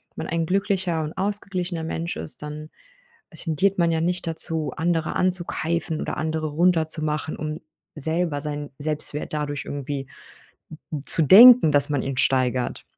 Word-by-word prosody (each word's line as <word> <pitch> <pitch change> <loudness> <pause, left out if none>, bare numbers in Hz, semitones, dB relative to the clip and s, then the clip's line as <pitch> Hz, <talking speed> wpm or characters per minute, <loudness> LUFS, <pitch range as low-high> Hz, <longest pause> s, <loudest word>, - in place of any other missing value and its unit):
man - - -5
ein 165 0 -1
glücklicher 190 -2 0
und 155 +1 -6
ausgeglichener 190 -4 -2
Mensch 165 +1 -4
ist, 155 - -4
dann, 150 +1 -7 0.6
äh, 160 - -14
tendiert 185 +5 0
man 170 -1 +3
ja 160 -1 0
nicht 175 +1 -2
dazu, 160 -3 -2
andere 165 -1 -1
anzukeifen 170 -3 -1
oder - - -4
andere 155 0 -2
runterzumachen, 155 -2 +1
um 155 +1 -5 0.4
selber 160 0 +1
seinen 145 -1 -5
Selbstwert 150 0 -4
dadurch 145 -1 -3
irgendwie, 140 -1 -5 0.6
n 155 - -9
n 150 -3 -4
zu 165 - -1
denken, 225 - +9
dass 145 0 +5
man 145 -3 -1
ihn 135 -1 -4
steigert, 130 -2 0
160 Hz, 155 wpm, -23 LUFS, 150-175 Hz, 0.6 s, denken